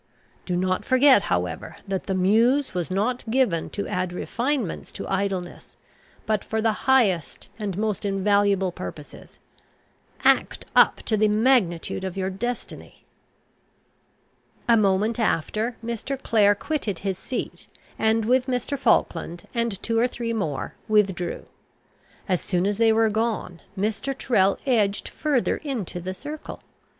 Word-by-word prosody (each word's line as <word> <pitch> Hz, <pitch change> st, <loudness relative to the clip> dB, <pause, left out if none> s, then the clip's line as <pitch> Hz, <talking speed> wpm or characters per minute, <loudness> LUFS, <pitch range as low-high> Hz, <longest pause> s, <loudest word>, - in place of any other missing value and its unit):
Do 180 Hz, -, 0 dB
not 185 Hz, +1 st, 0 dB
forget, 260 Hz, -3 st, +5 dB
however, 90 Hz, 0 st, -2 dB
that 195 Hz, -1 st, -2 dB
the 190 Hz, -, -1 dB
Muse 230 Hz, +9 st, +3 dB
was 180 Hz, -1 st, -2 dB
not 215 Hz, +7 st, 0 dB
given 220 Hz, -10 st, +1 dB
to 200 Hz, -, -4 dB
add 180 Hz, -1 st, -2 dB
refinements 240 Hz, -, -2 dB
to -, -, -6 dB
idleness, 190 Hz, -2 st, -3 dB, 0.5 s
but 215 Hz, -2 st, 0 dB
for 220 Hz, -, -2 dB
the 220 Hz, +1 st, -1 dB
highest 205 Hz, -, +2 dB
and 200 Hz, -4 st, -3 dB
most 215 Hz, -1 st, -1 dB
invaluable 200 Hz, -1 st, +2 dB
purposes. 90 Hz, -, -9 dB, 0.9 s
Act -, -, +2 dB
up -, -, +5 dB
to 220 Hz, -, 0 dB
the 215 Hz, +1 st, +4 dB
magnitude 210 Hz, -6 st, +2 dB
of 190 Hz, 0 st, -4 dB
your 190 Hz, 0 st, -1 dB
destiny." 240 Hz, +5 st, -6 dB, 1.6 s
A 235 Hz, -, +6 dB
moment 210 Hz, +2 st, +2 dB
after, 220 Hz, +3 st, 0 dB
Mr. 235 Hz, +4 st, -3 dB
Clare 205 Hz, -5 st, +3 dB
quitted 220 Hz, -, -3 dB
his 190 Hz, -2 st, -1 dB
seat, 255 Hz, -, -5 dB, 0.3 s
and 220 Hz, 0 st, +2 dB
with 255 Hz, +2 st, +2 dB
Mr. 255 Hz, +2 st, -2 dB
Falkland 170 Hz, -8 st, +1 dB
and 235 Hz, -5 st, -1 dB
two 230 Hz, -1 st, +1 dB
or 240 Hz, -, +4 dB
three 235 Hz, -2 st, -4 dB
more 160 Hz, -11 st, -3 dB
withdrew. 195 Hz, -5 st, +1 dB, 0.8 s
As 185 Hz, -3 st, +1 dB
soon 180 Hz, -2 st, 0 dB
as 205 Hz, +1 st, -1 dB
they 225 Hz, -1 st, +5 dB
were 225 Hz, 0 st, +3 dB
gone, 215 Hz, -5 st, -2 dB, 0.2 s
Mr. 220 Hz, +7 st, -2 dB
Tyrrel 195 Hz, -8 st, +2 dB
edged 210 Hz, -6 st, +1 dB
further 285 Hz, -6 st, 0 dB
into 240 Hz, -, -4 dB
the 185 Hz, +2 st, -5 dB
circle. 300 Hz, +8 st, -8 dB
210 Hz, 140 wpm, -24 LUFS, 190-235 Hz, 1.6 s, A